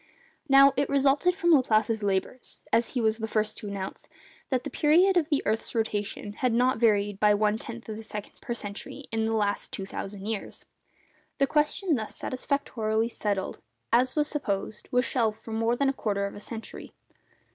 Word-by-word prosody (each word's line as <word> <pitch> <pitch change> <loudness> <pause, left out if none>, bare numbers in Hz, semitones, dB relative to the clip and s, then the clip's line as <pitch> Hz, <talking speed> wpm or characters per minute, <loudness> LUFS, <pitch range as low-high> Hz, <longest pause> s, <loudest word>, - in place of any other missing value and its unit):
Now 275 0 +7
it 280 0 +1
resulted 280 +6 +3
from 345 -3 +2
Laplace's 225 -5 +3
labours—as 210 +3 -1
he - - +2
was 220 0 +2
the 220 - -2
first 215 -1 0
to 210 - -7
announce—that 200 +5 -6
the - - -4
period 350 +6 +4
of 330 -3 +2
the 290 -3 +1
earth's 220 +3 -1
rotation 210 -2 -2
has 250 +3 0
not 250 +1 +2
varied 205 -3 +2
by 210 -1 +5
one 210 0 +2
tenth 235 +1 -8
of 220 - -5
a 220 - -7
second 210 -2 -8
per 240 - -3
century 210 +6 -7
in 225 -1 0
the 225 - 0
last 205 -2 -1
two 195 - -5
thousand 195 0 -6
years. 220 -2 -5 0.7
The 275 - +4
question 300 +5 +1
thus 215 -2 -5
satisfactorily 230 -5 -1
settled, 200 -4 -2 0.3
as 255 +2 +3
was 300 -1 +2
supposed, 210 -8 -3
was 250 +1 +3
shelved 225 -4 0
for 225 - -8
more 225 +2 +1
than 275 +2 +1
a 270 - +2
quarter 200 -6 -1
of 200 - -5
a - - -9
century. 225 +1 -8
225 Hz, 180 wpm, -27 LUFS, 210-270 Hz, 0.7 s, Now